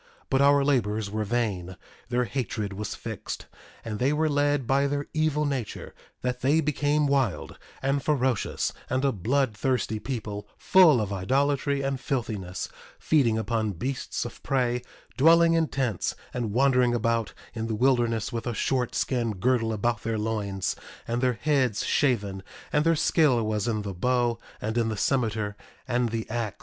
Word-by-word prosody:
But 135 - +3
our 140 0 +5
labors 110 -7 +1
were 110 +1 -1
vain; 100 -5 -2 0.3
their 125 0 +1
hatred 110 -5 -3
was 105 +1 -4
fixed, - - -6 0.4
and 110 -2 -4
they 130 +3 +2
were 155 +1 +1
led 145 -2 +1
by 140 +3 +2
their 145 0 -2
evil 155 -1 +1
nature 135 -7 -4 0.3
that 125 0 -2
they 145 +5 +3
became 150 0 +1
wild, 135 -8 0 0.2
and 140 +1 +1
ferocious, 130 -7 0 0.2
and 130 +2 0
a 135 - +3
bloodthirsty 125 +1 0
people, 105 -5 -5
full 175 -9 +6
of 105 -2 -2
idolatry 140 +7 +1
and 135 -1 -1
filthiness; 110 - -3 0.3
feeding 125 -8 +2
upon 110 -1 -1
beasts 130 +10 -3
of 120 - -8
prey; 125 -3 0 0.4
dwelling 165 +3 +6
in 165 -1 +2
tents, 130 -9 -1 0.2
and 120 -4 -2
wandering 125 0 +3
about 115 -1 0 0.2
in 115 -1 -3
the 110 - -1
wilderness 120 -2 +1
with 115 +1 -3
a 120 - -2
short 125 0 0
skin 120 -4 0
girdle 115 +3 +1
about 115 +2 0
their 115 0 -2
loins 105 -3 -2 0.3
and 120 +1 -1
their 130 -1 +2
heads 135 -8 +1
shaven; 105 -9 +1 0.3
and 150 +1 +3
their 165 0 +4
skill 150 -7 +3
was 105 -1 -1
in 110 -3 -1
the 100 -1 -4
bow, 120 +4 +1 0.2
and 110 +2 -1
in 115 -1 +1
the 110 - -3
cimeter, 110 -4 0 0.3
and 120 -1 +1
the 115 0 -3
ax. 115 -2 -3
120 Hz, 160 wpm, -27 LUFS, 110-140 Hz, 0.4 s, full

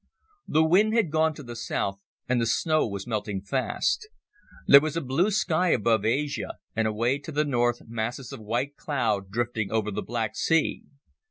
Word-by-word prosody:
The 155 - +3
wind 200 +7 +4
had 210 -10 +2
gone 160 0 +2
to 145 - -9
the 120 -1 -8
south 100 -4 -3 0.3
and 125 -1 +1
the 115 - +1
snow 155 +6 +2
was 100 -2 -5
melting 105 -4 -3
fast. 135 - -1 0.6
There 140 - +9
was 155 +1 -2
a - - +2
blue 150 +9 +1
sky 185 -4 +1
above 110 -5 +2
Asia, 140 +6 -1 0.2
and 110 0 +1
away 115 +6 0
to 145 +2 -8
the 150 +1 +1
north 120 -3 0
masses 115 +3 -4
of - - -7
white 120 +7 -2
cloud 110 -9 -1
drifting 115 -1 -2
over 110 -1 0
the 105 +1 -3
Black 110 -2 -3
Sea. 165 -1 +1
120 Hz, 180 wpm, -26 LUFS, 110-155 Hz, 0.6 s, There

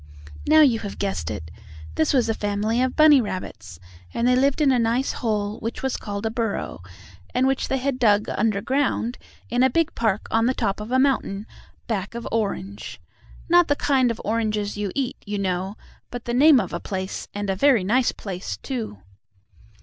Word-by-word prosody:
Now 310 +1 +7
you 250 -7 +4
have 205 -3 -6
guessed 85 -5 -2
it. 80 +1 -6 0.4
This 155 - +1
was 255 -5 +2
a 225 - +1
family 210 +3 -1
of 255 0 0
bunny 305 -3 +7
rabbits, 110 - -6 0.4
and 235 +1 +1
they 250 - +4
lived 275 +3 +2
in 290 -3 +4
a 250 - +3
nice 235 +3 +1
hole, 210 -3 -2
which 230 +3 -5
was 265 -1 0
called 200 0 -5
a 220 - 0
burrow, 225 - -3 0.5
and 255 - +3
which 270 0 +1
they 270 - 0
had 265 0 -2
dug 210 -3 +3
under 210 -2 0
ground 260 -3 0 0.3
in 245 +1 +2
a 260 - +5
big 330 +5 +1
park 220 -3 0
on 225 +1 +3
the 260 - +1
top 195 - -1
of 210 +3 -7
a 260 - +3
mountain, 245 -7 +1 0.4
back 210 -1 -3
of 235 - -5
Orange. 200 -2 -3 0.5
Not 350 0 +5
the 290 - +2
kind 265 -4 +2
of 230 - -3
oranges 215 -2 -1
you 205 -2 -3
eat, 270 -2 -2
you 205 -1 -4
know, 190 +1 -2 0.3
but 245 -1 -7
the 240 - -2
name 280 +2 +6
of 190 -6 -3
a 170 - -2
place, 190 0 -5
and 205 0 -3
a - - -1
very 245 -1 +4
nice 245 +6 +2
place, 190 -2 -6
too. 225 - -5
225 Hz, 195 wpm, -23 LUFS, 205-260 Hz, 0.5 s, Now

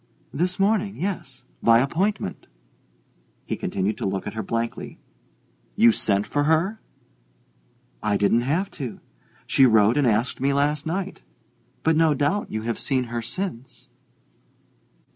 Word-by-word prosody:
"This 180 +4 0
morning, 200 0 +1
yes 170 -9 -4 0.2
by 115 0 +6
appointment." 160 - -1 1.0
He - - -2
continued 100 +2 -2
to - - -1
look 95 0 -3
at 105 - -5
her 110 - -3
blankly. 115 +3 -4 0.8
"You 115 - +6
sent 100 -2 +1
for 145 0 0
her?" 170 +8 +1 1.2
"I 105 -1 +1
didn't 105 +4 +3
have 165 +10 -1
to 130 -6 -6 0.5
she 135 - +5
wrote 110 +2 +4
and 140 - +3
asked 115 +3 0
me 140 +1 +2
last 145 +2 0
night. 190 +4 -3 0.6
But 160 0 +3
no 160 -2 +4
doubt 170 +9 0
you 110 0 -3
have 115 0 -2
seen 130 -2 0
her 120 - -1
since." 125 - -6
135 Hz, 140 wpm, -24 LUFS, 115-170 Hz, 1.2 s, by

